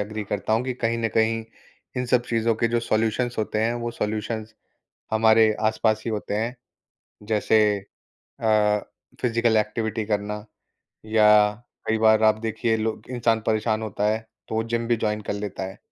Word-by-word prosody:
Agree 105 +1 -4
करता 105 +2 -2
हूँ 115 +3 +2
कि 130 - -1
कहीं 115 -1 -1
न 115 -1 0
कहीं 110 0 +2 0.5
इन 125 0 -1
सब 125 0 +3
चीज़ों 115 0 +1
के 115 +1 +1
जो 120 0 +1
सॉल्यूशंस 115 +2 0
होते 110 0 -1
हैं, 115 +1 +1
वो 120 0 -3
सॉल्यूशंस 110 0 -3 0.6
हमारे 110 0 +5 0.2
आसपास 110 0 +1
ही 115 - -1
होते 105 -1 -3
हैं। 115 +4 -2 0.7
जैसे 110 0 +3 0.8
अ, 105 -1 +3 0.4
फिज़िकल 115 -2 +2
एक्टिविटी 110 +1 -1
करना, 105 0 -1 0.7
या 105 -1 +5 0.3
कई 110 - +1
बार 110 0 +5
आप 110 0 +4
देखिए 115 0 0
लोग 110 0 -3
इंसान 115 -2 +1
परेशान 110 0 +1
होता 105 -1 -2
है, 110 +1 +1 0.3
तो - - -4
वो 110 - +1
जिम 115 0 0
भी 120 - +3
जॉइन 105 -1 -1
कर - - +1
लेता 100 -1 -5
है, 95 0 -8
110 Hz, 170 wpm, -24 LUFS, 105-115 Hz, 0.8 s, हमारे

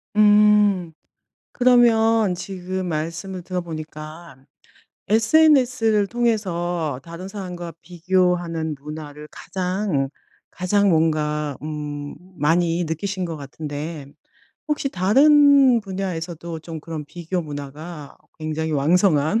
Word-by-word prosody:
음. 210 -4 +4 0.6
그러면 225 -4 +4
지금 185 0 -5
말씀을 170 +4 -4
들어 180 0 -3
보니까 155 -1 -8 0.7
SNS를 230 -3 +4
통해서 175 - -1
다른 170 +2 -8
사람과 180 -4 -7
비교하는 175 -2 0
문화를 150 0 -9
가장, 180 -7 -2 0.4
가장 200 +2 +1
뭔가 150 -3 0
음 150 -1 -5 0.2
많이 170 +3 +1
느끼신 185 +4 -3
것 165 -2 -5
같은데 145 +1 -6 0.6
혹시 300 -2 -1
다른 275 +5 +5
분야에서도 175 -4 -5
좀 160 0 -8
그런 155 -1 -6
비교 175 +3 -4
문화가 150 +1 -8 0.2
굉장히 155 0 -3
왕성한 160 +4 +3
175 Hz, 225 characters per minute, -22 LUFS, 155-205 Hz, 0.7 s, 다른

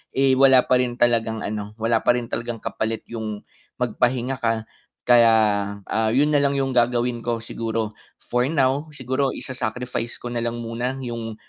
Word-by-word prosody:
eh, 135 0 +4
wala 130 -1 +6
pa 125 - +3
rin 125 -1 0
talagang 115 -3 +1
ano, 105 0 -5
wala 115 0 +1
pa 120 - +3
rin 120 - -3
talagang 120 0 -3
kapalit 110 0 -3
yung 110 -3 -5 0.3
magpahinga 125 +1 0
ka. 115 -1 0 0.4
Kaya, 120 -2 +6 0.5
ah, 110 0 0
yun 140 +6 +3
na 145 - +4
lang 140 0 +1
yung 135 -1 0
gagawin 120 -1 +1
ko 115 -1 -2
siguro 115 -2 -3 0.4
for 125 +1 +2
now, 140 0 +1
siguro 130 +1 -1
isa-sacrifice 125 -1 -4
ko 120 - -7
nalang 120 0 -2
muna 120 +3 -3
yung 115 -2 -5
120 Hz, 160 wpm, -23 LUFS, 115-130 Hz, 0.5 s, wala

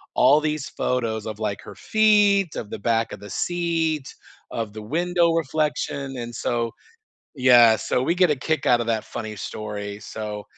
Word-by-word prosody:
all 145 +4 +5
these 150 -2 -2
photos 115 -4 -2
of, 110 -1 -6
like, 105 -2 -3
her 100 - -11
feet, 205 - +3
of 105 - -5
the - - -6
back 115 0 0
of - - -8
the 105 - -10
seat, 165 -4 -1 0.5
of 110 -2 -4
the 110 - -7
window 170 +7 +1
reflection, 150 -3 -2
and 120 0 -6
so 115 -1 -1 0.6
yeah, 120 -4 +6
so 125 - +1
we 170 - +1
get 180 -2 +4
a - - +2
kick 160 +4 -2
out 120 -1 +4
of 115 - -4
that 110 -2 -1
funny 110 -2 -6
story, 105 -1 -6
so, 105 -1 -6
125 Hz, 175 wpm, -23 LUFS, 110-160 Hz, 0.6 s, yeah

